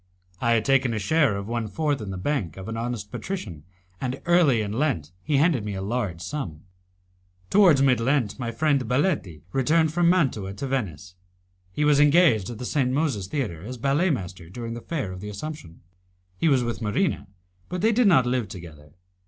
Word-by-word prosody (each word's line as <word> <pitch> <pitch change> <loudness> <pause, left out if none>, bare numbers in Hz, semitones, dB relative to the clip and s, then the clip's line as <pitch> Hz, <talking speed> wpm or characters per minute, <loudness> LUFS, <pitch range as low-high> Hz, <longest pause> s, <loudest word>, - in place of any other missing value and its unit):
I 115 0 +2
had 110 -2 +1
taken 130 -4 +2
a - - -1
share 110 +1 +2
of 100 0 -5
one 115 -1 -2
fourth 145 +2 -1
in 105 - -6
the 95 - -4
bank 100 - -2
of 95 - -8
an 115 - -4
honest 115 -3 -4
patrician, 95 - -6 0.4
and 130 +1 -3
early 170 -9 +4
in 105 -1 -3
Lent 110 - -1
he 145 -2 0
handed 145 -6 +3
me 105 -1 -4
a 95 - -4
large 100 -6 -2
sum. 90 - -5 0.9
Towards 175 -9 +6
mid 130 -3 +4
Lent 125 -1 0
my 120 -2 -2
friend 140 +4 +1
Baletti 125 - 0
returned 155 +4 +2
from 175 0 +3
Mantua 130 - +1
to 140 - -5
Venice. 100 - -3 0.6
He 150 +9 0
was 145 -1 +4
engaged 145 - +4
at 120 - -6
the 125 - -6
St. 130 -1 +1
Moses 130 - -1
Theatre 100 - -3
as 125 +6 -7
ballet 140 +9 +1
master 90 - -4
during 115 +4 -6
the 120 - -7
Fair 140 - -3
of 90 0 -8
the 105 - -6
Assumption. 105 - -8 0.5
He 165 - 0
was 135 -5 +3
with 120 -1 -3
Marina, 110 - 0 0.4
but 180 0 -3
they 220 +2 +4
did 235 0 +3
not 130 -10 +5
live 125 -3 0
together. 75 -5 -11
125 Hz, 195 wpm, -25 LUFS, 100-150 Hz, 0.9 s, Towards